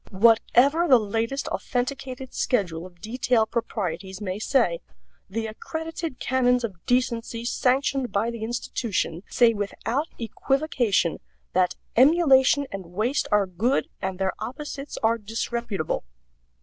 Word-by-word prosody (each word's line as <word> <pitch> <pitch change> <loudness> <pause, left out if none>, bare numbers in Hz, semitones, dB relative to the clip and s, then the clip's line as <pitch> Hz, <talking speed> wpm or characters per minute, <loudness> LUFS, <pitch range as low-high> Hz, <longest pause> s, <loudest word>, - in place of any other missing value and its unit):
Whatever 240 - +4
the 260 -5 +8
latest 225 +5 -2
authenticated 260 0 -3
schedule 180 -8 0
of 175 -2 -21
detail 235 0 +1
proprieties 190 -5 -3
may 195 -1 -4
say, 215 -9 +2 0.5
the 225 +3 -2
accredited 320 +6 -5
canons 250 -1 +2
of 190 -7 -5
decency 235 -2 0
sanctioned 260 +1 +1
by 220 +4 0
the 230 -2 -7
institution 220 -6 -2
say 235 -2 +4
without 225 +7 -2
equivocation 240 - 0 0.3
that 180 -1 +2 0.2
emulation 280 0 +5
and 195 -3 -6
waste 220 - 0
are 210 -1 +4
good 205 +9 0
and 190 -1 -2
their 190 0 0
opposites 285 +2 -6
are 230 +1 +3
disreputable. 225 -3 -3
230 Hz, 120 wpm, -25 LUFS, 200-260 Hz, 0.5 s, the